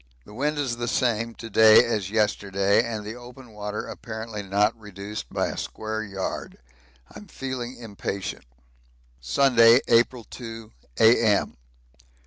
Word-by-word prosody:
The - - -14
wind 145 +6 -1
is 130 -5 -2
the 120 0 -3
same 115 -2 0
to 115 - -8
day 110 0 +7
as 105 -5 -2
yesterday, 100 -2 +1
and 110 -3 -5
the 105 - -5
open 125 0 -13
water 105 0 -5
apparently 110 -1 -7
not 100 +3 +1
reduced 105 - -8
by - - -1
a - - -6
square 110 0 -4
yard. 95 -3 -5 0.6
I'm 210 - -11
feeling 130 -5 -6
impatient. 100 -4 -5 0.7
Sunday, 115 - +5
April 120 +1 +3
2, 115 -2 -9 0.3
A.M. 110 -3 +4
110 Hz, 130 wpm, -25 LUFS, 105-120 Hz, 0.7 s, day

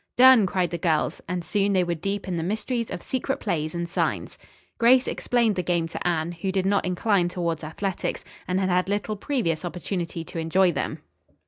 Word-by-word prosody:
"Done," 250 -5 +8
cried 180 -2 0
the 170 - -3
girls, 160 -2 0
and 180 -1 -3
soon 200 +3 +1
they 185 -1 +3
were 175 0 -1
deep 195 +4 -3
in 180 - -2
the 165 - -1
mysteries 220 +6 -2
of 175 - -6
secret 265 +1 -2
plays 155 -5 -2
and 170 0 -2
signs. 170 - -2 0.4
Grace 250 +2 +5
explained 235 -4 +1
the 180 - 0
game 170 -2 0
to 170 - -3
Anne, 165 -1 0
who 175 +3 -3
did 190 -1 0
not 200 +1 +2
incline 180 0 +1
towards 170 -3 -2
athletics, 175 +4 -3 0.2
and 185 +1 +1
had 190 -1 +1
had 180 +1 +1
little 205 +1 -1
previous 200 - -1
opportunity 175 -1 -4
to 165 - -6
enjoy 175 +3 +3
them. 145 - -3
180 Hz, 200 wpm, -25 LUFS, 170-205 Hz, 0.4 s, Done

